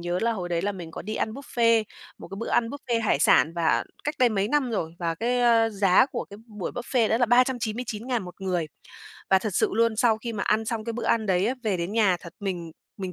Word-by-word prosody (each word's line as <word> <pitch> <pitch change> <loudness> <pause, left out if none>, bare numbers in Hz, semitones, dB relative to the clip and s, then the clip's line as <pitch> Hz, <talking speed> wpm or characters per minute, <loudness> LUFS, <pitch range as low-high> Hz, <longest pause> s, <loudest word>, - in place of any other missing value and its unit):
nhớ 175 +1 -2
là 230 0 +2
hồi 185 -5 -4
đấy 170 -1 -1
là 205 +1 -1
mình 175 -4 -8
có - - -7
đi 215 +3 -5
ăn 220 - -2
buffet, 230 -4 +1 0.3
một - - -10
cái 195 - -8
bữa 230 - -4
ăn 230 -1 +2
buffet 245 -3 -2
hải 215 - +2
sản 145 0 +4
và 170 -2 +1 0.2
cách 295 - -1
đây 250 - +5
mấy 205 -2 0
năm 280 -2 +1
rồi. 165 -7 -3
Và 170 -2 -1
cái, 245 +7 0
a, 230 -2 +4
giá 200 0 +4
của - - -5
cái 200 - -9
b 215 - -17 0.2
buổi 185 - -3
buffet 245 -2 0
đó - - +2
là 245 - +3
399.000 245 -1 0
một 180 +1 -11
người. 180 -4 -1 0.6
Và 190 - +6
thật 215 +3 -3
sự - - +2
luôn, 230 +1 +2
sau 225 -1 +3
khi 235 +1 -5
mà 210 - -3
ăn 220 +1 +1
xong 225 -1 -3
cái 230 - -3
bữa 235 - -5
ăn 220 -2 +1
đấy 185 0 +2
á, 250 - 0
về 210 -5 0
đến 170 +3 -3
nhà 210 -5 +3
thật 170 - -11
mình 180 -4 -4 0.3
mình 190 -2 -5
220 Hz, 260 wpm, -25 LUFS, 185-235 Hz, 0.6 s, Và